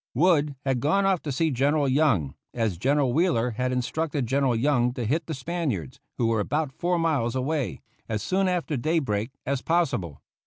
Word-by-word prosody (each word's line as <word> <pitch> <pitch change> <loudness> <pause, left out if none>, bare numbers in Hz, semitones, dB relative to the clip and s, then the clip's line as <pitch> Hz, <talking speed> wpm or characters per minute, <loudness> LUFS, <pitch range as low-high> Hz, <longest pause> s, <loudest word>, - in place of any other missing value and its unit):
Wood 150 -1 +3
had 135 -2 +1
gone 175 +9 +2
off 190 -3 +2
to 150 - -4
see 160 +4 +1
General 140 +3 +2
Young, 130 - +2 0.2
as 110 -8 -1
General 135 +2 +2
Wheeler 140 -7 +2
had 125 +3 -1
instructed 140 +3 -1
General 135 0 +1
Young 125 0 +2
to 120 - -3
hit 150 +7 0
the 160 - -3
Spaniards, 135 - -3 0.2
who 120 - +1
were 115 -1 +2
about 145 +7 -1
four 175 +4 0
miles 150 -8 0
away, 140 +1 -2 0.3
as 105 -2 -2
soon 190 - +1
after 175 -4 -1
daybreak 125 -7 0 0.2
as 135 -1 -1
possible. 135 - 0
140 Hz, 180 wpm, -26 LUFS, 120-160 Hz, 0.3 s, Wood